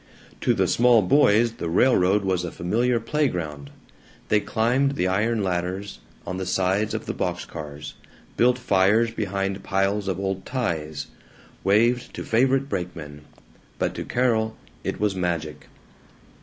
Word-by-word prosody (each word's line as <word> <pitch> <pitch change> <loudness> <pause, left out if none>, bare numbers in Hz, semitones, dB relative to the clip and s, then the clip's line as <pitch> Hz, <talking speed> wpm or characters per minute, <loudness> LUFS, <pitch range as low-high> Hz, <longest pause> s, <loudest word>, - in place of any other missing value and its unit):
To - - +2
the - - +2
small 120 -2 +4
boys 115 +1 +4
the 85 - -3
railroad 100 0 +3
was 90 -2 0
a 85 - -4
familiar 120 +7 0
playground. 90 - -2 0.6
They 105 - +4
climbed 125 +6 +1
the 90 - 0
iron 105 +3 +1
ladders 95 +2 -3 0.3
on 95 - -4
the 95 - -3
sides 95 +3 0
of - - -4
the - - -3
box - - -3
cars; 75 -2 -8 0.4
built 125 +1 +3
fires 110 0 +3
behind 100 -3 -2
piles 95 +1 0
of 95 -2 -2
old 95 -1 -2
ties; 80 - -3 0.6
waved 115 +5 +2
to - - -5
favorite 135 +4 +2
brakemen. 85 - -5 0.6
But - - -1
to - - -5
Carol 110 -3 0 0.3
it - - -3
was 105 -1 +1
magic. 85 -4 -3
100 Hz, 145 wpm, -24 LUFS, 90-115 Hz, 0.6 s, small